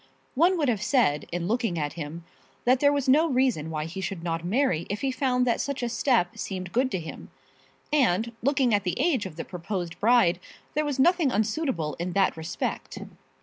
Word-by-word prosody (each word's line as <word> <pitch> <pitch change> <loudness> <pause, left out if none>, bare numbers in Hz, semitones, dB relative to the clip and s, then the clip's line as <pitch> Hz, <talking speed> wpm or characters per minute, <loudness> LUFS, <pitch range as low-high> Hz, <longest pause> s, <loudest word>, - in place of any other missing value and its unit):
One 345 +7 +3
would 300 -4 +1
have 225 -6 0
said 230 - +2
in 175 0 -2
looking 225 -5 0
at 145 -2 -2
him 165 +1 -7 0.4
that 250 +1 +4
there 285 +1 +4
was 285 -2 -1
no 300 +5 +5
reason 250 - +1
why 155 -1 -3
he 180 +4 -6
should 190 -3 -4
not 165 -1 -2
marry 190 - +1
if 205 +1 -3
he 270 - 0
found 255 -1 +1
that 235 -2 +1
such 280 -3 -3
a 240 - 0
step 230 -7 +1
seemed 185 -2 -5
good 255 +2 +2
to 190 - 0
him; 160 -1 -9 0.6
and 230 -6 +2
looking 265 -2 +2
at 205 -1 +2
the 180 - -2
age 265 - +1
of 170 - -11
the 165 - -5
proposed 180 -1 -5
bride, 215 -6 +4 0.3
there 305 0 0
was 290 -2 -2
nothing 330 0 +3
unsuitable 215 - -1
in 175 +1 -3
that 195 -1 +2
respect. 160 +1 -4
220 Hz, 200 wpm, -26 LUFS, 175-265 Hz, 0.6 s, no